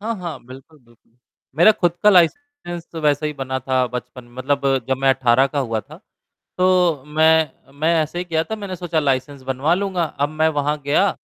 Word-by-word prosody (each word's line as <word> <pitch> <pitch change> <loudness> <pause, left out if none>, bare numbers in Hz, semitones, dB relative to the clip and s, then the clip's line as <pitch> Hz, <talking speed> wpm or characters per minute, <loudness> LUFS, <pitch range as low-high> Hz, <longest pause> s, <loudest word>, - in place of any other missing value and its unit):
हाँ, 225 +2 -3
हाँ, 175 -4 -6
बिल्कुल, 135 +4 -14
बिल्कुल। 120 -1 -28 0.4
मेरा 175 +7 +7
खुद 175 -4 0
का 210 - +7
लाइसेंस 180 - 0
तो 165 - -6
वैसे 150 0 +1
ही 150 - -3
बना 130 -2 -4
था, 130 0 0
बचपन 125 0 -8
मतलब 135 -1 0
जब 130 - +1
मैं 135 +1 +1
18 130 0 +3
का 140 +1 -4
हुआ 115 -5 -1
था, - - -14 0.6
तो 180 -6 +2
मैं 160 -1 +3 0.3
मैं 165 +2 +2
ऐसे 155 +3 -4
ही - - -2
किया 160 -2 0
था, 220 - -5
मैंने 200 -3 -6
सोचा 170 -2 -2
लाइसेंस 140 -1 -1
बनवा 135 +5 0
लूँगा। 190 -3 -1
अब 145 -2 -2
मैं 155 +1 +1
वहाँ 145 +1 0
गया, 155 +8 +3
150 Hz, 200 wpm, -20 LUFS, 135-175 Hz, 0.6 s, मेरा